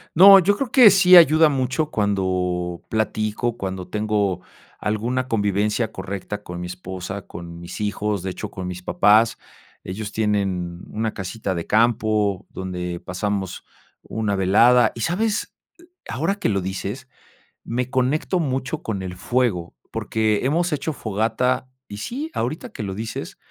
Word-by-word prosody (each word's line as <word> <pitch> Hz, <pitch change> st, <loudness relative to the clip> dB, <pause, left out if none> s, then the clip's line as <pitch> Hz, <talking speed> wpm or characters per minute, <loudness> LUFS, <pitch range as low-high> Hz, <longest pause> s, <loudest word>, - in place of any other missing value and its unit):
No, 195 Hz, +3 st, +10 dB
yo 200 Hz, +3 st, +3 dB
creo 260 Hz, -1 st, -3 dB
que 250 Hz, -5 st, +9 dB
sí 185 Hz, -1 st, +7 dB
ayuda 160 Hz, -2 st, +7 dB
mucho, 135 Hz, +3 st, -1 dB
cuando 90 Hz, -4 st, -1 dB
platico, 110 Hz, +1 st, -1 dB
cuando 95 Hz, -3 st, -5 dB
tengo, 105 Hz, -4 st, -1 dB, 0.4 s
alguna 120 Hz, +5 st, -1 dB
convivencia 105 Hz, 0 st, 0 dB
correcta 100 Hz, +2 st, -6 dB
con 90 Hz, 0 st, -7 dB
mi 90 Hz, -, -4 dB
esposa, 90 Hz, +2 st, -6 dB
con 85 Hz, 0 st, -9 dB
mis 85 Hz, +5 st, -8 dB
hijos, 105 Hz, -1 st, -1 dB
de 95 Hz, -, -2 dB
hecho 105 Hz, +2 st, -6 dB
con 95 Hz, -2 st, -6 dB
mis 90 Hz, 0 st, -6 dB
papás, 110 Hz, +5 st, +4 dB, 0.5 s
ellos 105 Hz, +3 st, -5 dB
tienen, 95 Hz, -5 st, -1 dB
mm, -, -, -14 dB
una 110 Hz, 0 st, -1 dB
casita 95 Hz, 0 st, -4 dB
de 85 Hz, -, -4 dB
campo, 110 Hz, -3 st, +2 dB
donde 90 Hz, -2 st, -5 dB
pasamos 95 Hz, 0 st, -3 dB, 0.4 s
una 105 Hz, -2 st, -2 dB
velada. 110 Hz, +6 st, +5 dB
Y, 115 Hz, -, -6 dB
¿sabes?, 205 Hz, -, -1 dB, 0.6 s
ahora 160 Hz, +11 st, 0 dB
que 200 Hz, -, -1 dB
lo 100 Hz, -2 st, 0 dB
dices, 100 Hz, +8 st, -5 dB, 0.5 s
me 125 Hz, +2 st, -2 dB
conecto 135 Hz, +8 st, 0 dB
mucho 135 Hz, 0 st, -2 dB
con 100 Hz, -4 st, -3 dB
el 90 Hz, -1 st, -6 dB
fuego, 95 Hz, -4 st, -1 dB, 0.2 s
porque, 110 Hz, -2 st, 0 dB
hemos 170 Hz, +6 st, +1 dB
hecho 150 Hz, +2 st, -2 dB
fogata, 115 Hz, +4 st, -1 dB, 0.2 s
y 100 Hz, -, -8 dB
sí, 270 Hz, -, -4 dB
ahorita 155 Hz, -, -3 dB
que -, -, -6 dB
lo 95 Hz, -2 st, -4 dB
dices 110 Hz, +3 st, -6 dB
105 Hz, 150 wpm, -22 LUFS, 95-130 Hz, 0.6 s, No